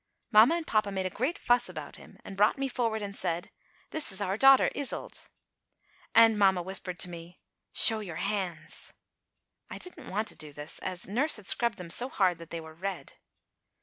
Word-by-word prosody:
Mamma 225 +9 +7
and 340 -2 -3
papa 215 -5 +1
made 190 -1 -2
a 185 - -2
great 260 - -2
fuss 245 0 +2
about - - -8
him - - -16
and 195 - -8
brought 205 +6 +3
me 275 0 -1
forward 230 -4 -1
and 200 -1 -6
said: 170 -2 -3 0.4
"This 315 -7 0
is 190 - -3
our 195 -1 -1
daughter 270 +4 +6
Iseult," 285 -2 -3 0.9
and 225 -1 +6
mamma 190 -3 +4
whispered 185 -1 -4
to 180 - 0
me: 170 +1 -11 0.3
"Show 225 -2 +5
your 185 -6 -7
hands." 190 -5 -4 0.8
I - - -7
didn't 360 - -10
want 215 +3 -2
to - - -9
do 150 -1 -6
this, 145 +2 -6
as 180 -2 -4
nurse 260 +11 +2
had 210 - -9
scrubbed 235 0 +3
them 175 -2 -8
so 250 +7 +3
hard 185 -8 +1
that 165 -1 -11
they 170 - -5
were 160 -1 -11
red. 190 +2 -6
200 Hz, 195 wpm, -29 LUFS, 180-230 Hz, 0.9 s, Mamma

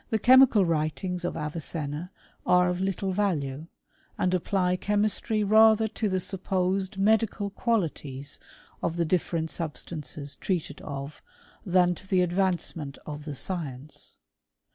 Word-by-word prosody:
The 220 - +2
chemical 250 -3 +6
writings 165 +3 -1
of 175 - -2
Avicenna 150 +1 -4 0.3
are 180 0 +4
of 180 +1 -2
little 195 0 -1
value, 160 -7 -1 0.5
and 185 - +1
apply 180 0 +1
chemistry 210 +2 +1
rather 220 +1 +6
to 215 0 -2
the 185 -1 0
supposed 190 +1 -1
medical 210 0 +2
qualities 150 - -2 0.4
of 170 - -2
the 170 - +1
different 165 -1 -1
substances 150 -3 -5
treated 170 -6 -3
of, 140 0 -7 0.5
than 180 -1 +4
to 190 - -12
the 185 -1 +3
advancement 175 -5 -1
of 150 0 -7
the 150 -2 -5
science. 150 -4 -5
180 Hz, 125 wpm, -27 LUFS, 155-195 Hz, 0.5 s, chemical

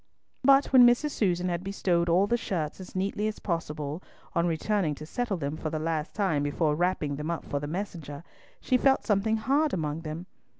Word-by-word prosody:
But 275 +1 +5
when 255 -2 +9
Mrs. 245 +5 +2
Susan 180 -6 0
had 175 0 -2
bestowed 180 -3 0
all 180 +4 +4
the 235 - +1
shirts 170 -10 -3
as 185 - -10
neatly 200 +3 -1
as 215 - -3
possible, 155 -3 -3 0.3
on 170 +1 +2
returning 170 -1 0
to 155 - -9
settle 235 +3 -2
them 145 -1 -3
for 155 - -4
the 155 - -3
last 160 0 -2
time 185 -9 +1
before 150 +2 +1
wrapping 155 -4 0
them 150 +2 -4
up 170 - -3
for 145 - -2
the 145 - -5
messenger, 165 -4 -5 0.4
she 255 - +2
felt 270 +1 +3
something 215 +2 +2
hard 280 +6 +1
among 155 -2 -2
them. 160 +2 -6
175 Hz, 200 wpm, -28 LUFS, 155-210 Hz, 0.4 s, when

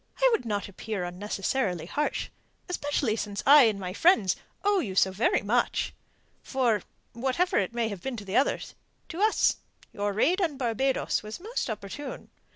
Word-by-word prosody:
"I - - +4
would 450 - +1
not 205 -3 -2
appear 200 0 -5
unnecessarily 190 +1 -2
harsh, 295 - -2 0.4
especially 290 - 0
since 205 -2 -4
I 285 -1 +9
and 215 -3 +1
my 185 -1 -4
friends 210 - +4 0.3
owe 405 -1 +3
you 195 - -3
so 190 0 +4
very 240 - +1
much. - - +1 0.5
For, 240 -6 +1 0.3
whatever 265 +10 +1
it 200 +4 -2
may 235 -1 +1
have 200 -4 -6
been 265 +2 -4
to 200 -2 -5
others, 270 - +1 0.4
to 345 +3 -5
us 435 +1 +3 0.4
your 205 0 -1
raid 315 - +2
upon 325 -7 0
Barbados 260 +2 0
was 215 +6 -7
most 440 - -3
opportune. 220 +7 -6
230 Hz, 160 wpm, -28 LUFS, 200-290 Hz, 0.5 s, I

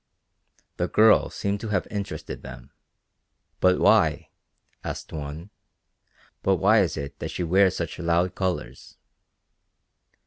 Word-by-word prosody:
The - - 0
girl 110 0 +5
seemed 100 0 -3
to 110 - -6
have 105 - 0
interested 100 -1 -5
them. - - -11 0.9
"But 90 0 +3
why," - - +3 0.5
asked - - -6
one, 75 +5 -7 0.9
"but 95 - +2
why 105 +4 +4
is 90 - -1
it 70 -1 -6
that - - -4
she 90 - -4
wears 95 +2 +3
such 85 0 -4
loud 85 +1 +1
colors?" 95 -2 -4
90 Hz, 125 wpm, -25 LUFS, 85-100 Hz, 0.9 s, girl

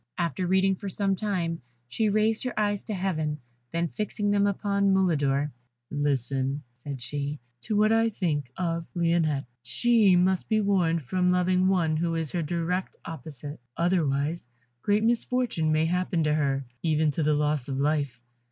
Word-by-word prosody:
After 175 0 -1
reading 190 +1 +3
for 200 0 -5
some 195 +1 0
time, 180 -5 -2 0.3
she 215 - 0
raised 215 +2 +2
her 255 -3 -3
eyes 205 -1 0
to 215 - -4
Heaven, 160 -5 -1 0.3
then 170 +1 0
fixing 205 +3 -2
them 205 0 +3
upon 200 0 +1
Mulidor, 150 -7 +2 0.4
"Listen," 140 -1 -1
said 130 +3 -7
she, 145 +3 -3 0.3
"to 220 - -1
what 215 +1 +4
I 225 0 +4
think 150 - -2
of 170 -2 -2
Lionette. 165 -4 +1 0.2
She 220 - +3
must 180 +1 +2
be 220 -1 +3
warned 180 -6 +2
from 180 +7 +1
loving 180 +1 +2
one 170 -5 +2
who 165 +1 0
is 160 -3 -2
her 175 - -1
direct 170 +3 -2
opposite, 150 -3 -7 0.2
otherwise 160 -4 0 0.3
great 205 +5 +2
misfortune 235 -7 +1
may 155 +1 +3
happen 180 0 0
to 150 -1 +2
her, 140 -3 0 0.2
even 155 -2 +2
to 150 - -2
the 150 0 +3
loss 150 -3 0
of 135 -2 -3
life. 140 -3 0
170 Hz, 160 wpm, -27 LUFS, 150-195 Hz, 0.4 s, what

